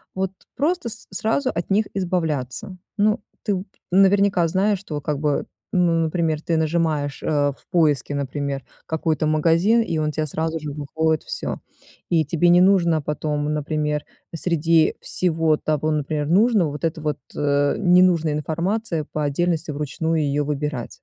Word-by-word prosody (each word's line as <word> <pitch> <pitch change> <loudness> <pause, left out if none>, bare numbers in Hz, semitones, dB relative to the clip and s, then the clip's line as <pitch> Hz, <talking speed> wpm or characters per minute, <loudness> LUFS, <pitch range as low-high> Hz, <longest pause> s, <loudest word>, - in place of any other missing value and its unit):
вот 190 0 -1 0.2
просто 305 -3 0
с 225 0 -7
сразу 225 +7 0
от 170 - -4
них 210 +2 +3
избавляться. 170 -5 -2 0.2
Ну, 210 0 +2 0.2
ты 195 -4 -1 0.3
наверняка 195 -1 +4
знаешь, 195 +4 +1
что, 155 -6 -5
как 145 0 -2
бы, 150 -1 0 0.3
ну, 180 -2 +3
например, 160 -1 0
ты 165 0 0
нажимаешь, 155 -3 0
э, - - -3 0.3
в - - -27
поиске, 150 -6 +2
например, 140 0 -3 0.2
какой-то 160 0 -1
магазин, 165 +9 +3
и 170 -7 -2
он 150 -1 0
те 155 0 -2
сразу 160 +2 -2
же 150 -1 -5
выходит 155 +2 -1
всё. - - -4 0.5
И 160 -2 +2
тебе 170 +4 +2
не 175 +1 +6
нужно 175 -4 +4
потом, 150 0 -2
например, 150 0 -1 0.3
среди 165 -1 +2
всего 165 -3 +1
того, 155 0 -1
например, 150 0 -1
нужного, 200 0 +3
вот 150 - -8
это 160 0 -2
вот, 150 -1 -1 0.2
ненужная 165 +3 +3
информация, 165 +3 -2
по 155 - -2
отдельности 160 +2 0
вручную 155 +3 -1
ее 145 0 0
выбирать. 145 -3 -3
160 Hz, 150 wpm, -22 LUFS, 150-180 Hz, 0.5 s, не